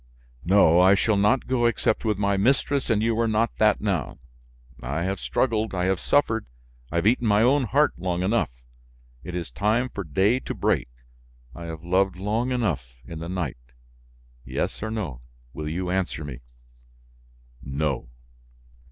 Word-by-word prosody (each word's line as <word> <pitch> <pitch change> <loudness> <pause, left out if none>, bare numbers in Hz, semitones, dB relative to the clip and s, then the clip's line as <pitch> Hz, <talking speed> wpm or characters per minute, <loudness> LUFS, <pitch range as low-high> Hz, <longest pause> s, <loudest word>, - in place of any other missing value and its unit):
"No, 90 -2 +5
I 95 +2 +6
shall 110 +2 +2
not 105 +6 +2
go 120 -2 +2
except 115 -1 0
with 110 -3 0
my 100 0 +1
mistress 135 +6 +1
and 110 -2 +2
you 115 0 +1
are 115 - +2
not 110 +1 +1
that 105 -2 +4
now. 95 -9 -2 0.6
I 70 +7 -2
have 95 +1 -2
struggled, 110 -3 0
I 90 0 0
have 95 -1 +1
suffered, 115 - +1 0.4
I - - -5
have 85 - +1
eaten 120 +1 +3
my 105 +1 +4
own 135 +2 +3
heart 145 +6 +2
long 90 -1 -1
enough. 115 +5 +1 0.7
It 90 - -6
is 85 -7 -4
time 110 - +1
for 100 - -5
day 95 - +2
to - - -6
break, - - 0 0.6
I 85 - -8
have 80 -1 -7
loved 95 +2 +1
long 110 +7 -1
enough 85 - -2
in 80 +4 -8
the 85 +1 -6
night. 90 -9 -3 0.9
Yes 65 +1 -3
or 110 - -3
no, 90 - -4 0.3
will 75 0 -5
you 90 +3 -3
answer 90 -4 -1
me?" 65 -4 -7 1.2
"No." 70 -2 -2
100 Hz, 165 wpm, -25 LUFS, 85-115 Hz, 1.2 s, I